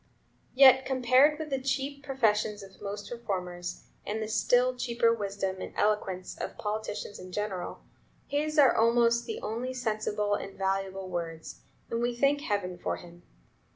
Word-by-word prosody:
Yet 265 Hz, 0 st, +8 dB
compared 260 Hz, +3 st, +4 dB
with 310 Hz, -2 st, -6 dB
the 270 Hz, -1 st, 0 dB
cheap 275 Hz, +1 st, -2 dB
professions 215 Hz, -6 st, +1 dB
of 195 Hz, -1 st, -15 dB
most 205 Hz, +1 st, -6 dB
reformers, 180 Hz, -6 st, -4 dB, 0.2 s
and 215 Hz, +2 st, -3 dB
the 215 Hz, -, -3 dB
still 250 Hz, +3 st, +3 dB
cheaper 235 Hz, -2 st, +2 dB
wisdom 195 Hz, -3 st, -3 dB
and -, -, -7 dB
eloquence 195 Hz, -3 st, 0 dB
of -, -, -6 dB
politicians 210 Hz, -1 st, -4 dB
in 185 Hz, -, -10 dB
general, 200 Hz, -2 st, -4 dB, 0.4 s
his 305 Hz, +2 st, -1 dB
are 275 Hz, -4 st, +6 dB
almost 235 Hz, +1 st, +3 dB
the 225 Hz, -, -4 dB
only 240 Hz, +4 st, -3 dB
sensible 215 Hz, -3 st, -1 dB
and 195 Hz, -1 st, -4 dB
valuable 195 Hz, 0 st, -1 dB
words, 165 Hz, -3 st, -5 dB, 0.3 s
and 230 Hz, 0 st, -1 dB
we 240 Hz, 0 st, 0 dB
thank 280 Hz, +3 st, +2 dB
heaven 200 Hz, -, -2 dB
for -, -, -1 dB
him. 175 Hz, 0 st, -13 dB
215 Hz, 155 wpm, -29 LUFS, 195-255 Hz, 0.4 s, Yet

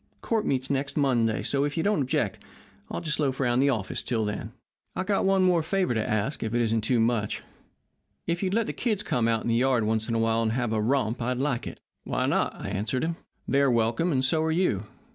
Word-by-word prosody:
Court 225 Hz, -2 st, 0 dB
meets 130 Hz, 0 st, 0 dB
next 140 Hz, +1 st, -2 dB
Monday, 120 Hz, -6 st, +2 dB
so, 140 Hz, 0 st, +1 dB
if 145 Hz, +2 st, -2 dB
you 165 Hz, -, +1 dB
don't 205 Hz, -5 st, +2 dB
object, 135 Hz, -6 st, -1 dB, 0.5 s
I'll -, -, -4 dB
just 155 Hz, -4 st, -2 dB
loaf 135 Hz, -3 st, 0 dB
around 125 Hz, -2 st, +2 dB
the 140 Hz, +1 st, +4 dB
office 110 Hz, -8 st, -1 dB
until 110 Hz, -3 st, -1 dB
then. 105 Hz, 0 st, -4 dB, 0.4 s
I've 185 Hz, -, -2 dB
got 200 Hz, -1 st, +1 dB
one 190 Hz, -1 st, +4 dB
favour 185 Hz, -3 st, 0 dB
to 110 Hz, -1 st, -1 dB
ask, 110 Hz, +7 st, -1 dB
if 110 Hz, +1 st, -2 dB
it 120 Hz, -, +2 dB
isn't 115 Hz, -1 st, +1 dB
too 120 Hz, +2 st, +1 dB
much. 115 Hz, -2 st, 0 dB, 0.8 s
If 170 Hz, +1 st, -1 dB
you'd 190 Hz, 0 st, 0 dB
let 230 Hz, -1 st, +2 dB
the -, -, -4 dB
kids 215 Hz, -5 st, -1 dB
come 115 Hz, -2 st, 0 dB
out 115 Hz, -1 st, +1 dB
in -, -, -4 dB
the 115 Hz, -, +2 dB
yard 125 Hz, -1 st, +2 dB
once 110 Hz, +1 st, 0 dB
in 115 Hz, -, 0 dB
a -, -, +2 dB
while 115 Hz, 0 st, +2 dB
and 110 Hz, -1 st, 0 dB
have 120 Hz, -2 st, -1 dB
a 110 Hz, -, +1 dB
romp 120 Hz, 0 st, 0 dB
I'd 125 Hz, +2 st, -1 dB
like 135 Hz, -2 st, -1 dB
it.' -, -, -8 dB, 0.2 s
"'Why -, -, -1 dB
not?' -, -, +1 dB
I -, -, -5 dB
answered 105 Hz, +6 st, -1 dB
him. 165 Hz, +1 st, -1 dB, 0.3 s
'They're 140 Hz, 0 st, +3 dB
welcome, 115 Hz, +8 st, +1 dB
and 130 Hz, -3 st, +1 dB
so 155 Hz, +4 st, +2 dB
are 160 Hz, -, 0 dB
you. 160 Hz, -, +1 dB
125 Hz, 240 wpm, -27 LUFS, 115-155 Hz, 0.8 s, the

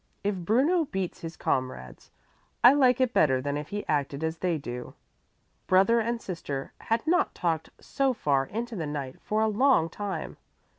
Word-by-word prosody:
"If 205 Hz, +1 st, +1 dB
Bruno 260 Hz, -, +2 dB
beats 190 Hz, -8 st, -4 dB
his 165 Hz, 0 st, -7 dB
comrades, 130 Hz, -, -3 dB, 0.5 s
I 245 Hz, -, +9 dB
like 255 Hz, -3 st, +4 dB
it 255 Hz, -2 st, +2 dB
better 130 Hz, -4 st, +3 dB
than 140 Hz, +2 st, -2 dB
if 150 Hz, 0 st, -4 dB
he 205 Hz, 0 st, -4 dB
acted 145 Hz, 0 st, -1 dB
as 160 Hz, 0 st, -2 dB
they 175 Hz, -3 st, 0 dB
do." 125 Hz, -3 st, -7 dB, 0.7 s
Brother 195 Hz, +6 st, +4 dB
and 230 Hz, +1 st, -1 dB
sister 145 Hz, -9 st, -5 dB
had 225 Hz, +4 st, -1 dB
not 355 Hz, +3 st, +2 dB
talked 165 Hz, -3 st, -1 dB
so 275 Hz, -2 st, 0 dB
far 140 Hz, -, 0 dB
into 235 Hz, +2 st, -4 dB
the 165 Hz, -6 st, -3 dB
night 140 Hz, -3 st, -5 dB
for 215 Hz, +1 st, 0 dB
a -, -, +3 dB
long 215 Hz, -6 st, +3 dB
time. 205 Hz, -2 st, -5 dB
185 Hz, 170 wpm, -27 LUFS, 145-235 Hz, 0.7 s, I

